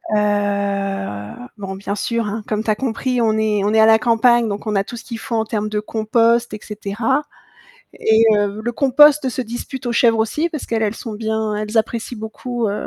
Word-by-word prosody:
Heu, 200 - -1 0.3
bon, 195 -2 -6
bien 200 +1 -4
sûr, 230 +2 -2
hein, 215 +1 -4
comme 215 0 -1
tu 220 - -4
as 215 - +3
compris, 250 +1 -1
on 220 -1 +2
est 215 -2 +1
on 210 +2 +1
est 220 - +4
à 220 - +7
la 220 0 +6
campagne, 235 0 +3
donc 205 +2 -5
on 210 - -1
a 195 - +2
tout 240 - -8
ce - - -9
qu'il 230 -2 -6
faut 235 - -4
en 220 0 +1
termes 215 -1 -2
de 210 - -1
compost 230 +2 +1
et 210 - -5
cetera 220 +6 -2 0.8
et 220 +1 +4
heu, 205 0 0
le 240 +2 -2
compost 280 +2 +5
se 255 +1 -3
dispute 245 +2 -6
aux 240 - 0
chèvres 230 -1 +3
aussi 260 +10 0
parce 305 -4 -5
qu'elles, 225 -1 -1
elles 215 +1 -1
sont 225 - -7
bien 220 0 -2
elles 210 +2 -1
apprécient 230 +1 -2
beaucoup, 230 +2 -4
heu 200 - -3
220 Hz, 220 wpm, -19 LUFS, 210-235 Hz, 0.8 s, à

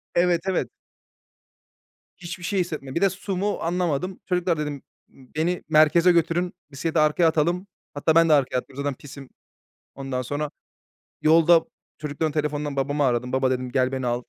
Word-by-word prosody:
Evet, 175 -1 +3
evet. 190 - 0 1.5
Hiçbir 175 0 -8
şey 195 +2 -1
hissetmedim. 155 -7 -4
Bir 170 - 0
de 195 - +5
su, 195 +1 -5
mu 205 +3 -1
anlamadım. 175 +1 -1
"Çocuklar," 180 -2 0
dedim, 150 -2 -4 0.3
ımm, 130 -2 -19
"beni 175 +3 -1
merkeze 160 +3 +5
götürün, 170 +1 +1 0.2
bisiklete 160 +4 -1
arkaya 155 +3 +3
atalım." 170 +4 0 0.3
Hatta 155 +2 +1
ben 165 0 +5
de - - +6
arkaya 135 -3 +2
atladım 130 +1 -6
zaten 145 -1 -1
pisim. 135 0 -12 0.7
Ondan 135 -2 -3
sonra, 145 +4 -3 0.7
yolda 165 +1 +5 0.3
çocukların 150 +1 -2
telefondan 150 -1 -2
babamı 145 +2 0
aradım. 125 -1 0
"Baba 130 0 +2
dedim 125 -1 -2
gel 130 0 +1
beni 130 -1 -2
al. 120 0 -1
155 Hz, 160 wpm, -24 LUFS, 140-175 Hz, 1.5 s, de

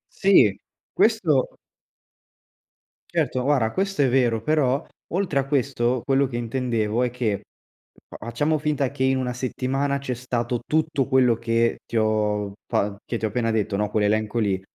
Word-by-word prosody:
Sì. 190 - +5 0.3
Questo 175 - +2 1.6
certo, 130 - 0
guarda 125 -5 +2
questo 195 -5 0
è - - +3
vero, 120 -3 +2
però, 145 -1 +1 0.3
oltre 180 -7 0
a 135 - -2
questo 130 -3 0
quello 135 0 +2
che 120 - -5
intendevo 115 -2 -1
è 125 - +1
che 115 -4 -1
f - - -22
facciamo 145 +7 0
finta 145 -3 0
che 140 - -9
in 130 0 +2
una 125 -1 -2
settimana 135 +3 -1
c'è 135 -2 -4
stato 120 -1 -2
tutto 155 -3 0
quello 130 -3 +4
che 115 0 0
ti 115 - -2
ho 105 -2 0
fa 100 0 0
che 120 - -3
ti 110 - -3
ho - - 0
appena 115 0 -1
detto, 105 -3 0
no, 105 0 0
quell'elenco 110 +1 0
lì. 100 -4 0
125 Hz, 160 wpm, -24 LUFS, 115-140 Hz, 1.6 s, Sì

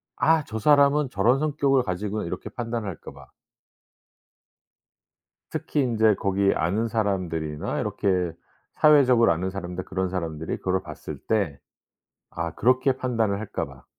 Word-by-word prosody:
'아 160 -1 +3
저 110 - -5
사람은 140 +2 +4
저런 115 +7 +3
성격을 140 -3 +2
가지구나.' 100 +3 -3
이렇게 85 - -5
판단할까 115 -7 -5
봐. - - -15 2.2
특히 145 - -1
인제 110 -4 +3
거기에 100 0 +1
아는 105 +8 0
사람들이나 90 -9 -2
이렇게 90 -3 0 0.4
사회적으로 130 - +5
아는 95 +3 -3
사람들 90 -1 -5
그런 95 0 -2
사람들이 80 -4 -4
그거를 95 0 -1
봤을 - - -8
때 95 -11 0 0.8
아 85 -1 -2
그렇게 130 +3 +3
판단을 115 -6 0
할까 110 -1 -4
봐. - - -14
105 Hz, 305 characters per minute, -25 LUFS, 90-125 Hz, 2.2 s, 사회적으로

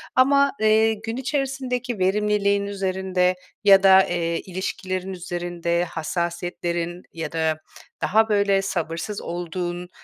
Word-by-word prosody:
Ama, 280 +2 +5
eee, 220 +1 +4
gün 225 +3 -5
içerisindeki 260 -4 -2
verimliliğin 200 +1 +2
üzerinde 190 -2 0 0.3
ya 195 -1 +7
da, 190 0 +8
eee, 170 -1 -1
ilişkilerin 185 0 -4
üzerinde, 175 -1 -2
hassasiyetlerin 175 +1 -3
ya 160 -2 -5
da 160 -1 0 0.4
daha, 220 +2 +3
böyle, 200 -2 +3
sabırsız 170 +1 -3
olduğun, 175 +1 -4
190 Hz, 110 wpm, -23 LUFS, 175-210 Hz, 0.4 s, da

